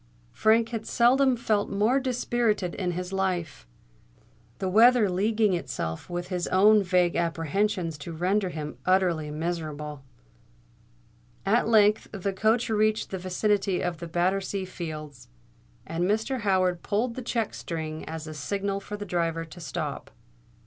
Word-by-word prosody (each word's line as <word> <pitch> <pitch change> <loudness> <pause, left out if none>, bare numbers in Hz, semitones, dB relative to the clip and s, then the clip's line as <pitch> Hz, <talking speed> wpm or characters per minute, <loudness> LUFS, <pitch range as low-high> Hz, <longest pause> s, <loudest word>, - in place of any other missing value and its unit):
Frank 225 +1 +3
had 225 -2 -5
seldom 255 +2 +4
felt 215 -3 0
more 215 +7 +2
dispirited 235 -7 0
in 180 -2 -2
his 180 +2 -5
life, 180 - -2 0.9
the 190 - -2
weather 225 +3 +6
leaguing 210 +2 +1
itself 80 - -4
with 175 0 -4
his 180 -2 -2
own 210 +3 +5
vague 180 -2 +2
apprehensions 170 0 -1
to 155 +4 -7
render 185 +4 0
him 150 -6 -6
utterly 180 -4 +2
miserable. 150 -3 -4 1.4
At 225 +4 +3
length 215 -1 +4
the 200 -1 -3
coach 220 +5 +2
reached 215 0 +1
the 190 - -3
vicinity 195 +1 0
of 175 -3 -2
Battersea 190 +2 0
Fields; 155 -7 -7 0.6
and 170 +2 -1
Mr. 220 +7 0
Howard 185 -4 +1
pulled 225 +4 -1
the 255 - -6
check 230 -2 -2
string 160 -2 -5
as 160 0 -6
a 155 - -7
signal 195 +6 -2
for 210 +1 -7
the 205 - -6
driver 165 -3 -1
to 165 +2 -12
stop. 165 - -5
190 Hz, 140 wpm, -27 LUFS, 170-215 Hz, 1.4 s, weather